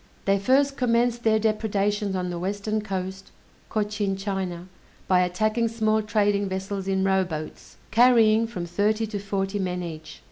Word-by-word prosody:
They 195 Hz, 0 st, +3 dB
first 275 Hz, +6 st, +2 dB
commenced 240 Hz, -1 st, +1 dB
their 220 Hz, -1 st, +4 dB
depredations 210 Hz, -2 st, 0 dB
on 180 Hz, -1 st, -2 dB
the 175 Hz, -, -4 dB
Western 205 Hz, +3 st, -2 dB
coast 190 Hz, -1 st, -5 dB, 0.4 s
(Cochin 205 Hz, -2 st, -1 dB
China), 190 Hz, -3 st, -4 dB, 0.4 s
by 185 Hz, -1 st, +4 dB
attacking 215 Hz, +6 st, +1 dB
small 220 Hz, -1 st, +1 dB
trading 205 Hz, -2 st, +1 dB
vessels 190 Hz, +1 st, -4 dB
in 190 Hz, 0 st, +1 dB
rowboats, 185 Hz, -5 st, -2 dB
carrying 230 Hz, -2 st, +5 dB
from 185 Hz, -7 st, -5 dB
thirty 210 Hz, +6 st, 0 dB
to 210 Hz, -2 st, -5 dB
forty 195 Hz, 0 st, -2 dB
men 180 Hz, -1 st, -2 dB
each. 155 Hz, -2 st, -8 dB
200 Hz, 145 wpm, -25 LUFS, 190-220 Hz, 0.4 s, carrying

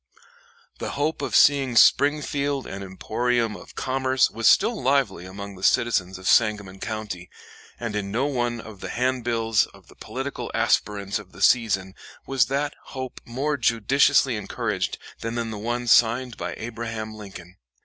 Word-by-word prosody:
The -, -, -4 dB
hope 150 Hz, +3 st, -1 dB
of -, -, -2 dB
seeing 135 Hz, -4 st, +5 dB
Springfield 140 Hz, +1 st, +3 dB
an 100 Hz, -, -7 dB
emporium 115 Hz, +4 st, -1 dB
of -, -, -13 dB
commerce 130 Hz, 0 st, +1 dB
was 115 Hz, +1 st, 0 dB
still 220 Hz, +3 st, +4 dB
lively 130 Hz, -9 st, +1 dB
among 100 Hz, +1 st, -8 dB
the 95 Hz, -, -13 dB
citizens 95 Hz, -4 st, +2 dB
of 95 Hz, 0 st, -7 dB
Sangamon 105 Hz, -4 st, +2 dB
County, 105 Hz, -5 st, -5 dB, 0.5 s
and 115 Hz, -3 st, -4 dB
in 100 Hz, -1 st, -2 dB
no 120 Hz, +6 st, 0 dB
one 120 Hz, -4 st, -1 dB
of 110 Hz, -3 st, -10 dB
the -, -, -6 dB
handbills 120 Hz, -3 st, +1 dB
of -, -, -19 dB
the -, -, -16 dB
political -, -, -5 dB
aspirants 100 Hz, 0 st, +1 dB
of 95 Hz, -3 st, -14 dB
the -, -, -12 dB
season 100 Hz, -6 st, +3 dB, 0.3 s
was 130 Hz, -4 st, +2 dB
that 140 Hz, +2 st, -1 dB, 0.2 s
hope 130 Hz, -1 st, -6 dB
more 140 Hz, +5 st, -2 dB
judiciously 120 Hz, +1 st, +3 dB
encouraged 105 Hz, -, -2 dB, 0.2 s
than 115 Hz, +1 st, -4 dB
in 115 Hz, -1 st, -2 dB
the 105 Hz, -, -6 dB
one 120 Hz, +3 st, -2 dB
signed 120 Hz, +1 st, +3 dB
by -, -, -5 dB
Abraham 115 Hz, -1 st, -5 dB
Lincoln. 95 Hz, -4 st, -11 dB
115 Hz, 155 wpm, -24 LUFS, 105-130 Hz, 0.5 s, seeing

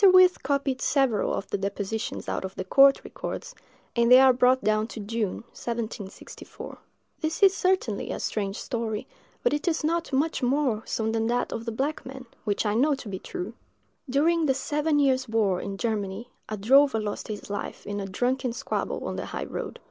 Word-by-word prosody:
Wirth 370 Hz, -1 st, +6 dB
copied 275 Hz, -2 st, 0 dB
several 265 Hz, -7 st, +2 dB
of 195 Hz, -, -3 dB
the 200 Hz, -, 0 dB
depositions 200 Hz, +2 st, -3 dB
out -, -, -2 dB
of 190 Hz, 0 st, -6 dB
the -, -, -3 dB
court 275 Hz, +8 st, +6 dB
records, -, -, -6 dB, 0.4 s
and 235 Hz, 0 st, +3 dB
they 255 Hz, -, +10 dB
are 265 Hz, -1 st, +7 dB
brought 255 Hz, +1 st, +3 dB
down 215 Hz, +1 st, +2 dB
to 230 Hz, -, -8 dB
June, 215 Hz, 0 st, -2 dB
1764. 230 Hz, -4 st, -6 dB, 0.4 s
This 320 Hz, +4 st, -2 dB
is 390 Hz, -1 st, +7 dB
certainly 365 Hz, -, 0 dB
a -, -, -3 dB
strange 200 Hz, -2 st, -2 dB
story; 225 Hz, -4 st, -3 dB, 0.4 s
but -, -, +3 dB
it 295 Hz, +4 st, -2 dB
is 325 Hz, -2 st, +1 dB
not 335 Hz, +1 st, 0 dB
much 290 Hz, +4 st, +1 dB
more 255 Hz, -3 st, +1 dB
so 220 Hz, 0 st, -1 dB
than 225 Hz, 0 st, 0 dB
that 245 Hz, +1 st, 0 dB
of 230 Hz, -, -5 dB
the 230 Hz, -, -2 dB
black 275 Hz, +7 st, -2 dB
man, 265 Hz, 0 st, -9 dB, 0.2 s
which 205 Hz, 0 st, 0 dB
I 205 Hz, -, +1 dB
know 280 Hz, +6 st, +3 dB
to 265 Hz, -, -10 dB
be 190 Hz, -2 st, -4 dB
true. 190 Hz, +4 st, -6 dB, 0.6 s
During 320 Hz, +4 st, +3 dB
the 265 Hz, -, +3 dB
seven 295 Hz, +3 st, 0 dB
years' 260 Hz, -3 st, +2 dB
war 210 Hz, -5 st, +1 dB
in 195 Hz, 0 st, -5 dB
Germany, 215 Hz, +1 st, -3 dB, 0.2 s
a 215 Hz, -, -3 dB
drover 265 Hz, +4 st, +5 dB
lost 210 Hz, -1 st, -4 dB
his 210 Hz, -1 st, -6 dB
life 205 Hz, -, -5 dB
in 205 Hz, 0 st, -3 dB
a 195 Hz, -, -4 dB
drunken 250 Hz, +5 st, 0 dB
squabble -, -, -3 dB
on -, -, -4 dB
the -, -, -4 dB
high -, -, -4 dB
road. -, -, -5 dB
240 Hz, 195 wpm, -26 LUFS, 210-275 Hz, 0.6 s, they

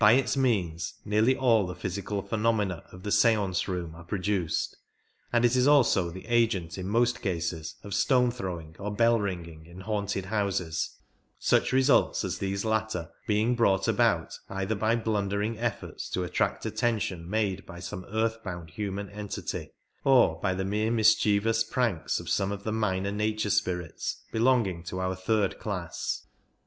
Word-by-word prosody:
By 105 Hz, 0 st, +8 dB
its 135 Hz, +2 st, +2 dB
means 95 Hz, -11 st, 0 dB
nearly 110 Hz, +5 st, +3 dB
all 115 Hz, -7 st, +3 dB
the 90 Hz, -, -5 dB
physical 100 Hz, +2 st, -3 dB
phenomena 105 Hz, -3 st, 0 dB
of 90 Hz, 0 st, -12 dB
the 105 Hz, -, -3 dB
seance 105 Hz, -4 st, +3 dB
room 90 Hz, -3 st, -3 dB
are 85 Hz, +1 st, -11 dB
produced, 95 Hz, -1 st, -1 dB, 0.6 s
and 120 Hz, 0 st, +3 dB
it 120 Hz, +1 st, +3 dB
is 125 Hz, +1 st, +4 dB
also 120 Hz, -11 st, +4 dB
the 95 Hz, +3 st, -9 dB
agent 110 Hz, -8 st, +1 dB
in 95 Hz, -, -4 dB
most 120 Hz, +3 st, +2 dB
cases 85 Hz, -3 st, -2 dB
of 100 Hz, -, -6 dB
stone 125 Hz, +4 st, +3 dB
throwing 85 Hz, -9 st, -6 dB
or 105 Hz, +1 st, -3 dB
bell 115 Hz, +1 st, +4 dB
ringing 85 Hz, -5 st, -5 dB
in 90 Hz, +2 st, -11 dB
haunted 100 Hz, -1 st, -2 dB
houses, 95 Hz, -5 st, -1 dB, 0.4 s
such -, -, +2 dB
results 130 Hz, +1 st, +3 dB
as -, -, -3 dB
these 100 Hz, +1 st, -2 dB
latter 110 Hz, -6 st, -1 dB, 0.2 s
being 110 Hz, +3 st, +2 dB
brought 95 Hz, -5 st, +2 dB
about -, -, +2 dB, 0.2 s
either 95 Hz, +2 st, -2 dB
by 110 Hz, +2 st, +1 dB
blundering 105 Hz, -1 st, -1 dB
efforts 120 Hz, -3 st, -3 dB
to 90 Hz, -, -1 dB
attract 90 Hz, -, -1 dB
attention 105 Hz, -8 st, -1 dB
made 100 Hz, -2 st, 0 dB
by 85 Hz, -2 st, -9 dB
some 90 Hz, +1 st, -6 dB
earth 110 Hz, +1 st, -1 dB
bound 85 Hz, -4 st, -6 dB
human 100 Hz, -1 st, -4 dB
entity, 105 Hz, 0 st, -5 dB, 0.3 s
or 125 Hz, -12 st, +5 dB
by 95 Hz, -2 st, +1 dB
the 95 Hz, 0 st, -2 dB
mere 105 Hz, +3 st, 0 dB
mischievous 110 Hz, 0 st, +3 dB
pranks 115 Hz, -8 st, 0 dB
of -, -, -9 dB
some 95 Hz, 0 st, +1 dB
of 100 Hz, 0 st, -5 dB
the 110 Hz, -, -2 dB
minor 100 Hz, -3 st, 0 dB
nature 105 Hz, 0 st, 0 dB
spirits 90 Hz, -4 st, -2 dB
belonging 115 Hz, -7 st, +2 dB
to 90 Hz, +2 st, -5 dB
our 95 Hz, 0 st, 0 dB
third 100 Hz, +2 st, 0 dB
class. 90 Hz, -6 st, -3 dB
100 Hz, 160 wpm, -28 LUFS, 90-110 Hz, 0.6 s, By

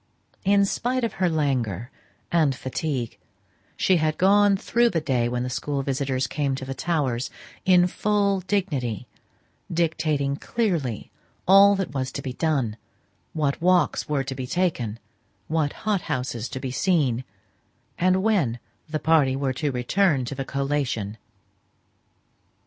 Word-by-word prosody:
In 200 Hz, +1 st, +4 dB
spite 250 Hz, +5 st, -1 dB
of 230 Hz, -, -1 dB
her 180 Hz, -, +4 dB
languor 130 Hz, -, -1 dB, 0.4 s
and 155 Hz, -6 st, +3 dB
fatigue, 130 Hz, -2 st, -3 dB, 0.6 s
she 185 Hz, -, +3 dB
had 155 Hz, -1 st, 0 dB
gone 200 Hz, +1 st, +5 dB
through 235 Hz, +4 st, +2 dB
the 170 Hz, -, 0 dB
day 125 Hz, -6 st, 0 dB
when 125 Hz, 0 st, -1 dB
the -, -, -2 dB
school 140 Hz, +1 st, -2 dB
visitors 135 Hz, -1 st, -1 dB
came 140 Hz, +1 st, -1 dB
to 130 Hz, -, -6 dB
the 135 Hz, -, -4 dB
Towers, 135 Hz, -5 st, -1 dB, 0.4 s
in 180 Hz, -1 st, +6 dB
full 200 Hz, +1 st, +1 dB
dignity, 165 Hz, -, -2 dB, 0.7 s
dictating 155 Hz, -4 st, 0 dB
clearly 165 Hz, -, -2 dB, 0.4 s
all 200 Hz, +2 st, +8 dB
that 190 Hz, -7 st, -3 dB
was 130 Hz, -1 st, -2 dB
to -, -, -5 dB
be 130 Hz, -, -4 dB
done, 130 Hz, -7 st, 0 dB, 0.6 s
what 145 Hz, -2 st, -1 dB
walks 180 Hz, -2 st, +2 dB
were 145 Hz, -2 st, +1 dB
to 135 Hz, 0 st, -4 dB
be 130 Hz, -1 st, -5 dB
taken, 125 Hz, -, -1 dB, 0.5 s
what 155 Hz, -2 st, 0 dB
hothouses 130 Hz, -, -1 dB
to 130 Hz, -, -5 dB
be 130 Hz, -1 st, -4 dB
seen, 135 Hz, -6 st, +1 dB, 0.8 s
and 185 Hz, +1 st, +3 dB
when 180 Hz, -, +2 dB, 0.3 s
the 155 Hz, -, -1 dB
party 150 Hz, -4 st, +3 dB
were 135 Hz, -1 st, -1 dB
to 145 Hz, +2 st, -1 dB
return 135 Hz, +3 st, +1 dB
to 120 Hz, -, -4 dB
the 135 Hz, 0 st, -4 dB
"collation." 135 Hz, -7 st, -2 dB
145 Hz, 140 wpm, -24 LUFS, 130-185 Hz, 0.8 s, all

